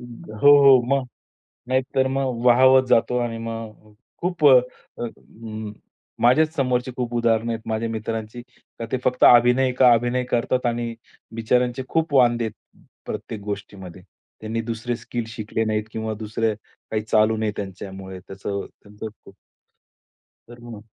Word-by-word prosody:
हो, 120 Hz, 0 st, -2 dB
हो. 140 Hz, -2 st, +8 dB
मग 140 Hz, -1 st, +1 dB, 0.6 s
नाहीतर 130 Hz, +1 st, 0 dB
मग 130 Hz, -3 st, -2 dB
वाहावत 130 Hz, +2 st, +6 dB
जातो 125 Hz, +2 st, +3 dB
आणि 120 Hz, -1 st, -3 dB
मग 115 Hz, -2 st, -8 dB, 0.3 s
खूप 175 Hz, -3 st, -1 dB
अ, 130 Hz, -3 st, +8 dB, 0.4 s
अं, 110 Hz, -2 st, -8 dB, 0.5 s
माझ्याच 155 Hz, +6 st, +4 dB
समोरची 125 Hz, -1 st, 0 dB
खूप 120 Hz, -2 st, -4 dB
उदाहरणं 115 Hz, -1 st, +1 dB
आहेत 115 Hz, -1 st, -4 dB
माझ्या 110 Hz, +1 st, -2 dB
मित्रांची. 110 Hz, +1 st, -5 dB, 0.4 s
तर 115 Hz, -, -3 dB
ते 130 Hz, -, +1 dB
फक्त 125 Hz, 0 st, 0 dB
अभिनय 125 Hz, +2 st, +6 dB
एक 125 Hz, +1 st, -4 dB
अ, 125 Hz, -, +8 dB
अभिनय 120 Hz, +2 st, 0 dB
करतात 125 Hz, +1 st, 0 dB
आणि 120 Hz, -1 st, -1 dB, 0.4 s
बिचचाऱ्यांचे 125 Hz, +3 st, 0 dB
खूप 160 Hz, -2 st, -1 dB
वांदे 120 Hz, -3 st, +4 dB
आहेत 110 Hz, -1 st, -11 dB, 0.3 s
प्रत्येक 105 Hz, 0 st, -6 dB
गोष्टीमध्ये. 100 Hz, -3 st, -7 dB, 0.4 s
त्यांनी 110 Hz, +1 st, -3 dB
दुसरे 115 Hz, +1 st, -4 dB
स्किल 120 Hz, 0 st, -5 dB
शिकले 110 Hz, -1 st, -3 dB
नाहीत 110 Hz, 0 st, -1 dB
किंवा 110 Hz, 0 st, -4 dB
दुसरे 110 Hz, +1 st, -1 dB
काही 110 Hz, 0 st, -7 dB
चालू 110 Hz, 0 st, +2 dB
नाहीये 110 Hz, -1 st, -1 dB
त्यांच्यामुळे 95 Hz, -1 st, -7 dB
त्याचं 95 Hz, +2 st, -6 dB, 0.4 s
खूप, 110 Hz, -1 st, -9 dB, 1.2 s
तर 120 Hz, 0 st, -13 dB
मग. 115 Hz, -3 st, -10 dB
115 Hz, 140 wpm, -22 LUFS, 110-125 Hz, 1.2 s, हो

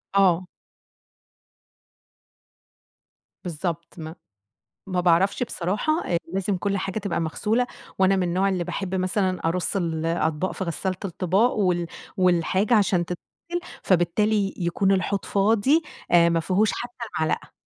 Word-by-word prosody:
آه. 185 Hz, -2 st, +4 dB, 3.0 s
بالضبط 170 Hz, -1 st, -4 dB
ما 160 Hz, +1 st, -7 dB, 0.7 s
ما 185 Hz, -1 st, 0 dB
باعرفش 180 Hz, +6 st, +3 dB
بصراحة 210 Hz, -, -1 dB, 0.2 s
أ 175 Hz, -, +2 dB, 0.2 s
لازم 195 Hz, 0 st, 0 dB
كل 200 Hz, +2 st, -1 dB
حاجة 195 Hz, +3 st, -3 dB
تبقى 195 Hz, -5 st, -2 dB
مغسولة 220 Hz, +9 st, 0 dB, 0.3 s
وأنا 190 Hz, +1 st, +4 dB
من 190 Hz, -, +1 dB
النوع 180 Hz, +3 st, +1 dB
اللي 185 Hz, -2 st, -1 dB
باحب 180 Hz, +2 st, -4 dB
مثلًا 185 Hz, 0 st, 0 dB
أرُص 180 Hz, +3 st, -1 dB
الأطباق 165 Hz, 0 st, -1 dB
في 190 Hz, -, -4 dB
غسّالة 185 Hz, +2 st, -2 dB
الطِباق 190 Hz, +6 st, +1 dB
وال 180 Hz, -4 st, +1 dB, 0.3 s
والحاجة 185 Hz, +3 st, +2 dB
عشان 190 Hz, -5 st, +3 dB
تتغِسل، 340 Hz, -, -6 dB, 0.2 s
فبالتالي 195 Hz, +3 st, +2 dB
يكون 190 Hz, +2 st, +1 dB
الحوض 195 Hz, +1 st, 0 dB
فاضي 225 Hz, +10 st, +3 dB, 0.3 s
آآ 170 Hz, -1 st, +6 dB
ما 165 Hz, -1 st, +2 dB
فيهوش 195 Hz, +6 st, +2 dB
حتّى 240 Hz, 0 st, -6 dB
معلقة. 160 Hz, -1 st, -1 dB
185 Hz, 120 wpm, -24 LUFS, 170-200 Hz, 3.0 s, آآ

